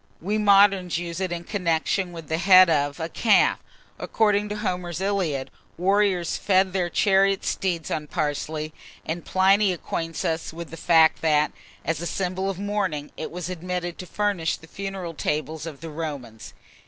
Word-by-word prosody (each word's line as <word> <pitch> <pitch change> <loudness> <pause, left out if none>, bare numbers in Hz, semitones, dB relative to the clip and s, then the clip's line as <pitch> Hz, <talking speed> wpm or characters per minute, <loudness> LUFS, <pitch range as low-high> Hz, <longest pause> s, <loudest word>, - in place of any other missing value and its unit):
we 200 +6 -2
moderns 200 -4 +4
use 170 0 -4
it 185 -2 -2
in 170 0 -4
connection 180 0 -1
with 165 -3 -9
the 160 +1 -1
head 185 -2 +7
of 145 -2 0
a 160 - -2
calf. 210 +5 +3 0.4
According 210 -1 +1
to 210 - -3
Homer's 180 -5 -3
"Iliad," 180 -9 -1 0.3
warriors 190 -1 +1
fed 190 -1 +2
their 180 -2 0
chariot 195 +1 +2
steeds 175 -4 -2
on 150 -1 -2
parsley; 155 +1 -3 0.3
and 165 +2 -4
Pliny 195 +1 +3
acquaints 165 -1 -4
us 160 0 -2
with 165 -1 -8
the - - -6
fact 160 -1 +4
that, 150 -2 +2 0.3
as 160 -1 -1
a 170 - -3
symbol 190 +2 -2
of 195 - -4
mourning, 195 -7 -2
it - - -5
was 175 0 -5
admitted 180 -1 -4
to 180 - -7
furnish 200 -6 -1
the - - -15
funeral 190 -1 -6
tables 155 +1 -3
of 150 -4 -9
the 165 -1 -7
Romans. 140 -8 -7
175 Hz, 165 wpm, -24 LUFS, 160-195 Hz, 0.4 s, head